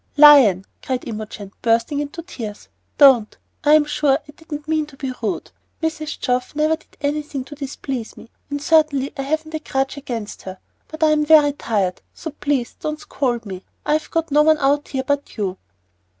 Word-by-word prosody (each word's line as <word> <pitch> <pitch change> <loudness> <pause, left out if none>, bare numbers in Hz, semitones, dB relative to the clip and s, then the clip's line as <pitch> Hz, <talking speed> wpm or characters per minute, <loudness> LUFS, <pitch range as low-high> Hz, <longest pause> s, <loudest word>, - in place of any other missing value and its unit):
"Lion," 270 -11 +8 0.2
cried 255 -1 -3
Imogen, 215 -3 -7
bursting 230 +5 +1
into 295 +3 -5
tears, 225 - -8 0.3
"don't! 265 -7 +6 0.3
I'm 300 0 +6
sure 295 -2 +2
I - - -11
didn't 300 -2 -8
mean 310 -1 0
to 280 -2 -16
be 265 -2 -4
rude. 220 - -3 0.3
Mrs. 320 -1 -3
Geoff 250 +2 -1
never 310 +1 +2
did 320 - -25
anything 290 -1 -2
to 295 - -10
displease 270 -4 -5
me, 230 - -14 0.2
and 285 0 -3
certainly 295 -3 +2
I 275 - -3
haven't 315 +3 -2
a 315 - -2
grudge 270 -2 -2
against 235 -6 -6
her. 190 0 -8 0.3
But 315 0 -4
I'm 305 -1 +4
very 300 -2 +6
tired, 200 -9 -1
so 320 - -6
please 280 -4 -1
don't 305 0 -2
s - - -14
c - - -19
o 275 - +4
ld 235 -1 -5
me; 190 -2 -7 0.2
I've 305 +1 0
got 330 -2 -1
no 295 +1 +5
one 310 0 +5
out 285 +1 +1
here 265 -1 -3
but 285 -1 -2
you." 195 -3 -2
285 Hz, 190 wpm, -21 LUFS, 245-305 Hz, 0.3 s, Lion